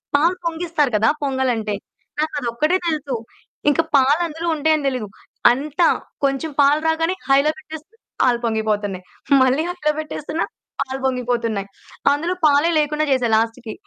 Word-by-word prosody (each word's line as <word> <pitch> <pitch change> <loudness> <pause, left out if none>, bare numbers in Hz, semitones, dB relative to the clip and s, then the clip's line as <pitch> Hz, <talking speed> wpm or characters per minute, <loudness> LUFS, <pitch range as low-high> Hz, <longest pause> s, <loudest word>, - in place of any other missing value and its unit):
పాలు 330 +5 +3
పొంగిస్తారు 325 -4 0
కదా 220 +2 +2 0.2
పొంగలంటే. 255 -6 0 0.5
నాకదొక్కటే 300 0 0
తెలుసు. 300 -5 -1 0.5
ఇంక 290 - +1 0.2
పాలందులో 310 +5 +2
ఉంటాయని 310 -1 +1
దెలీదు. 255 -5 -2 0.4
అంత 290 +6 -2 0.4
కొంచెం 275 +3 0
పాలు 285 +1 +5
రాగానే 325 +2 +1 0.2
హైలో 280 +3 +4
పెట్టేస్తే, 315 +4 -11 0.3
పాలు 245 -2 +4
పొంగిపోతన్నాయి. 210 -4 -1 0.4
మళ్ళీ 260 +4 +3
హైలో 355 -4 0
పెట్టేస్తున్న 305 +1 -4 0.4
పాలు 265 0 -3
పొంగిపోతున్నాయి. 235 -5 -1 0.4
అందులో 320 +5 0
పాలే 295 +2 +4
లేకుండా 300 +1 0
జేశా 255 -3 +2
లాస్ట్‌కి. 225 +1 -1
285 Hz, 120 wpm, -21 LUFS, 245-310 Hz, 0.5 s, పాలు